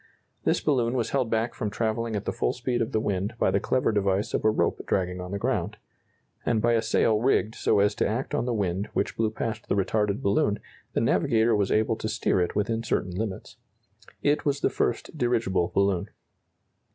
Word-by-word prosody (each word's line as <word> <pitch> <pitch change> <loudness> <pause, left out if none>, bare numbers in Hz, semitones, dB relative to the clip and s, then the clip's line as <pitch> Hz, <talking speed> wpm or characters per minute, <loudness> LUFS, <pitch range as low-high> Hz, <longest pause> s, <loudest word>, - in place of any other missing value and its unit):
This - - +3
balloon 125 -5 +1
was 115 -3 -1
held 130 -4 +1
back 115 +1 0
from 105 - -3
travelling 110 +1 -1
at 105 - -3
the - - -1
full - - 0
speed 125 0 -2
of 115 - -1
the 110 - +1
wind 100 +1 -2
by - - +2
the - - +2
clever 130 -2 +1
device 100 -1 0
of - - 0
a 110 - +5
rope 110 - 0
dragging 90 -1 -1
on 90 - -6
the 100 - -3
ground; - - -1 0.7
and 115 -2 +1
by 120 +2 +2
a 115 - +3
sail 110 -1 +2
rigged 115 -3 +2
so - - +1
as 100 +1 +3
to - - 0
act 120 +8 -3
on 150 - 0
the 125 - -1
wind 95 -1 -1
which - - -1
blew 110 -1 +1
past 110 0 -4
the - - +2
retarded 105 +1 0
balloon, 100 +1 +2 0.4
the - - +1
navigator 115 -2 +3
was 100 -2 +1
able 110 +1 +2
to 110 - -3
steer 110 -4 +1
it 90 - -1
within 115 +2 0
certain 95 -5 -1
limits. 95 +1 -5 0.7
It 145 +1 +2
was 140 -1 0
the - - +2
first - - -1
dirigible 115 -8 +1
balloon. 100 -3 +1
110 Hz, 210 wpm, -26 LUFS, 100-115 Hz, 0.7 s, a